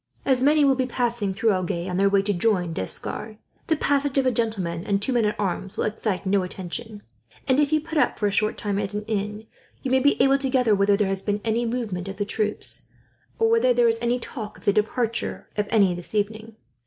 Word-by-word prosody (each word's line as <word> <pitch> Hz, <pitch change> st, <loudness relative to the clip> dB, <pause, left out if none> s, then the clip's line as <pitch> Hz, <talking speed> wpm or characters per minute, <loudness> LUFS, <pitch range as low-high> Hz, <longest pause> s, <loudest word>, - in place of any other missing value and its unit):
As 260 Hz, -2 st, +3 dB
many 295 Hz, +2 st, +4 dB
will 275 Hz, -, +5 dB
be 260 Hz, -1 st, -1 dB
passing 235 Hz, -5 st, -1 dB
through 220 Hz, +4 st, +1 dB
Agen, 180 Hz, -2 st, -2 dB
on 180 Hz, -1 st, -2 dB
their 200 Hz, +1 st, +4 dB
way 195 Hz, 0 st, +3 dB
to 205 Hz, 0 st, 0 dB
join 180 Hz, -3 st, +1 dB
D'Escars, 215 Hz, -, -3 dB, 0.3 s
the 320 Hz, -, +3 dB
passage 285 Hz, -2 st, 0 dB
of 270 Hz, -, +3 dB
a 255 Hz, -, +3 dB
gentleman 195 Hz, -8 st, -2 dB
and 200 Hz, -1 st, 0 dB
two 255 Hz, +6 st, +4 dB
men 235 Hz, -3 st, +2 dB
at 210 Hz, -, -1 dB
arms 195 Hz, 0 st, -3 dB
will -, -, 0 dB
excite 210 Hz, -2 st, -2 dB
no 195 Hz, +1 st, +2 dB
attention; 205 Hz, +4 st, -6 dB, 0.4 s
and 260 Hz, +1 st, +3 dB
if 295 Hz, 0 st, +2 dB
you 310 Hz, -, +3 dB
put 315 Hz, 0 st, -2 dB
up -, -, +2 dB
for 210 Hz, -, -1 dB
a 205 Hz, -, +2 dB
short 215 Hz, +2 st, +1 dB
time 200 Hz, -1 st, -2 dB
at 205 Hz, 0 st, -3 dB
an 210 Hz, -, -3 dB
inn, 210 Hz, 0 st, -3 dB, 0.4 s
you 260 Hz, -, -2 dB
may 260 Hz, -, +4 dB
be 285 Hz, +2 st, +2 dB
able 270 Hz, +1 st, +4 dB
to 270 Hz, -1 st, -1 dB
gather 250 Hz, -4 st, +3 dB
whether 200 Hz, 0 st, +3 dB
there 205 Hz, -1 st, +1 dB
has 195 Hz, 0 st, -1 dB
been 205 Hz, 0 st, -1 dB
any 230 Hz, +1 st, 0 dB
movement 215 Hz, -7 st, -3 dB
of 195 Hz, -, -7 dB
the 205 Hz, -, -1 dB
troops, 210 Hz, 0 st, -2 dB, 0.5 s
or 450 Hz, -, +3 dB
whether 460 Hz, -, +4 dB
there 240 Hz, 0 st, +4 dB
is 230 Hz, 0 st, +1 dB
any 240 Hz, +1 st, +1 dB
talk 220 Hz, -3 st, -7 dB
of -, -, -18 dB
the 200 Hz, -, +4 dB
departure 225 Hz, +2 st, -1 dB
of 210 Hz, -1 st, -1 dB
any, 200 Hz, -5 st, +4 dB
this 175 Hz, +4 st, -7 dB
evening. 215 Hz, +2 st, -2 dB
215 Hz, 240 wpm, -24 LUFS, 200-250 Hz, 0.5 s, will